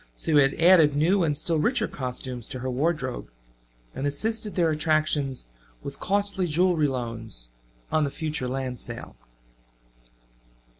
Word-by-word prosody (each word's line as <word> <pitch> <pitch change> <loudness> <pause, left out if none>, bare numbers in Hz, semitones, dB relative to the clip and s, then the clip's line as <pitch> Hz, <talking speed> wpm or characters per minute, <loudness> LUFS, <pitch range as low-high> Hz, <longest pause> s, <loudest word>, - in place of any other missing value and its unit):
So 160 - -3
he 145 - +8
had 135 0 +3
added 165 -4 +6
new 175 +7 +3
and 150 -4 +1
still 160 +1 0
richer 230 - +1
costumes 125 -2 -5
to - - -5
her 130 0 -2
wardrobe, 135 - -1 0.6
and 140 - -2
assisted 215 +8 -2
their 170 -3 +3
attractions 155 - 0 0.4
with - - -7
costly 200 -2 +1
jewelry 165 -1 +2
loans 115 - -4 0.4
on 155 - +3
the 145 - 0
future 150 -3 -3
land 130 -1 -3
sale. - - -7
150 Hz, 140 wpm, -26 LUFS, 130-170 Hz, 0.6 s, he